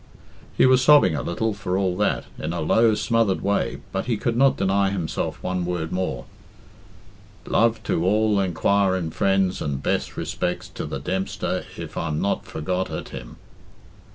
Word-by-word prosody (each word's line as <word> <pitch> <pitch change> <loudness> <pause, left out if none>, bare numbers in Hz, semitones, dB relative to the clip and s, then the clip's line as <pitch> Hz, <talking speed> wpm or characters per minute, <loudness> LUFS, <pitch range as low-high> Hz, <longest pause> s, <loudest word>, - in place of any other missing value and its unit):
He - - +6
was 130 0 +5
sobbing 145 - +6
a - - -2
little, 110 +6 -1
for 95 -2 -2
all 95 -2 0
that, 105 - +1 0.2
in 80 +2 -3
a 85 - -3
low, 110 +7 +4
smothered 115 -4 +1
way, 100 +1 -1
but 95 +4 -3
he 115 -3 +1
could 115 +2 -1
not 135 +2 +4
deny 100 0 +2
himself 90 -5 -3
one 90 -1 -1
word 85 -2 -3
more 95 0 -2 1.2
"luv 115 -1 +2
to 85 - 0
all 105 +2 +2
enquirin 95 -1 +1
frens 95 0 +1
and 70 -2 -3
bess - - -1
respecs 90 - -3
to - - -5
the - - -4
Dempster 95 +1 -2
if - - -7
im 80 -2 -2
not 100 - -1
forgot 90 +4 -2
at - - -5
him." - - -9
95 Hz, 165 wpm, -23 LUFS, 90-110 Hz, 1.2 s, He